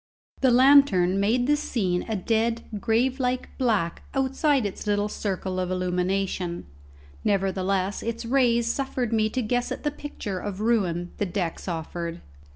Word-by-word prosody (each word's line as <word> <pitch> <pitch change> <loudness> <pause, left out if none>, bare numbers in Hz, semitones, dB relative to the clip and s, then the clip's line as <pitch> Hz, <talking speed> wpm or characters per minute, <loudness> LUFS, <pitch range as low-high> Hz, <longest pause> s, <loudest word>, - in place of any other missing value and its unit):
The 265 - +4
lantern 245 -8 +5
made 230 +5 +2
the 295 +3 +4
scene 195 -11 -1
a 220 - 0
dead, 225 +4 0 0.2
grave 245 +5 +1
like 250 0 -2
black 215 -10 +1
outside 270 -1 +2
its 200 +1 -5
little 205 0 +1
circle 190 -3 -3
of 180 -1 -1
illumination; 180 0 -1 0.6
nevertheless 195 0 0
its 230 +1 -4
rays 235 -2 +3
suffered 250 -1 -1
me 215 -1 +2
to 255 +3 -2
guess 245 +3 -1
at - - -5
the 295 - 0
picture 210 -10 -5
of 200 -1 -5
ruin 185 -6 0
the 205 - -1
decks 180 -2 -3
offered. 170 0 -4
210 Hz, 150 wpm, -25 LUFS, 185-245 Hz, 0.6 s, lantern